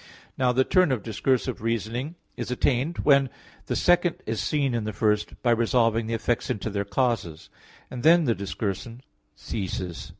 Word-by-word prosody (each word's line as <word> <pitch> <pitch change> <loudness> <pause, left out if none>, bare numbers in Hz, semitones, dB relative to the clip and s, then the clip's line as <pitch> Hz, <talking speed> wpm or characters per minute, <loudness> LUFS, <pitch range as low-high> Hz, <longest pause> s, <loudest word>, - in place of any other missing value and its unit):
Now 125 -1 +2
the 130 +2 +3
term 185 +1 +3
of 120 -6 -1
discursive 125 +2 -1
reasoning 115 - -2 0.2
is - - -5
attained 130 +5 0
when 140 -2 +4 0.4
the - - -1
second 175 -1 +3
is 110 -2 -2
seen 140 -4 0
in 115 -2 -1
the 110 0 -4
first, 105 -1 0
by 120 - +3
resolving 115 -1 +2
the 115 - -1
effects 120 +2 -1
into 105 +1 -2
their 100 0 -2
causes; 100 -7 -1 0.4
and 125 - -5
then 165 +4 +6
the 120 -6 +2
discursion 100 +3 -4 0.3
ceases. 90 -4 -5
115 Hz, 165 wpm, -25 LUFS, 105-130 Hz, 0.4 s, then